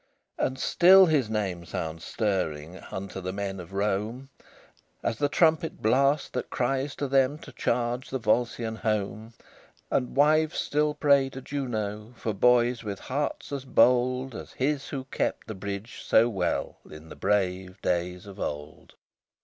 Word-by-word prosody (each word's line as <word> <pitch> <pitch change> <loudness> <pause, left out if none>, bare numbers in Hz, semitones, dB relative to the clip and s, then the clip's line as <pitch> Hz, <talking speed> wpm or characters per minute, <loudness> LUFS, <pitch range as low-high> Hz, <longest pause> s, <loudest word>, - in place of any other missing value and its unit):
LXVII - - +3
And 130 - -7
still 190 +5 +7
his 145 -9 +2
name 95 -6 -2
sounds 80 0 -5
stirring 90 -6 -2
Unto 95 0 -6
the 95 0 -3
men 100 0 -4
of 85 0 -9
Rome, 105 +6 -2 0.7
As 110 - -1
the 145 - +2
trumpet 160 +1 +2
blast 140 +6 +2
that 125 - -3
cries 135 +2 -1
to 140 - -2
them 135 +1 +3
To - - -12
charge 120 +1 -1
the 130 - -1
Volscian 115 0 0
home; 110 0 -2 0.6
And 125 - 0
wives 155 +2 +3
still 150 0 0
pray 140 -2 +4
to 135 - -8
Juno 110 -5 -4
For 110 - -2
boys 120 +3 +3
with 100 -2 -5
hearts 145 +2 -3
as 140 -2 -3
bold 125 0 +3
As - - -9
his 140 +1 -1
who 135 -2 -4
kept 130 - -2
the 110 - -6
bridge 100 +2 -6
so 115 +2 +5
well 95 -6 -2
In 80 +1 -11
the - - -9
brave 95 -1 -1
days 90 +1 -1
of 100 0 -11
old. 75 +1 -6
115 Hz, 155 wpm, -27 LUFS, 100-135 Hz, 0.7 s, still